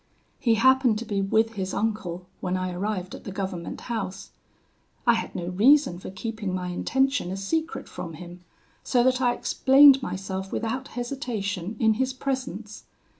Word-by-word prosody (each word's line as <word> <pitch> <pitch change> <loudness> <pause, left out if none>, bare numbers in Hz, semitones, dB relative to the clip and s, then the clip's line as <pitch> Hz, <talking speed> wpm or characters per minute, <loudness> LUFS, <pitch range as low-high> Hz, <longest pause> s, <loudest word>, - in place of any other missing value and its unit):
"He 230 -4 +3
happened 260 -1 +4
to 235 - -5
be 205 -3 -1
with 220 +3 +2
his 190 -3 -3
uncle 205 -5 -2
when 185 0 -1
I 185 0 -2
arrived 185 0 -3
at - - -9
the 200 - -6
government 190 -3 -5
house. 200 -5 -5 0.7
I 235 - +6
had 225 - -3
no 175 - -3
reason 215 0 +4
for - - -8
keeping 205 0 -4
my 180 -1 -3
intention 265 +4 0
a 190 - -3
secret 320 +12 -2
from 165 - -7
him, 175 +2 -10 0.4
so 245 -2 +2
that 255 0 +2
I 245 -1 +3
explained 270 0 +6
myself 190 -3 -4
without 245 +4 -2
hesitation 225 - -3
in 220 -1 +4
his 260 0 0
presence. 255 -6 -4
215 Hz, 165 wpm, -26 LUFS, 185-255 Hz, 0.7 s, I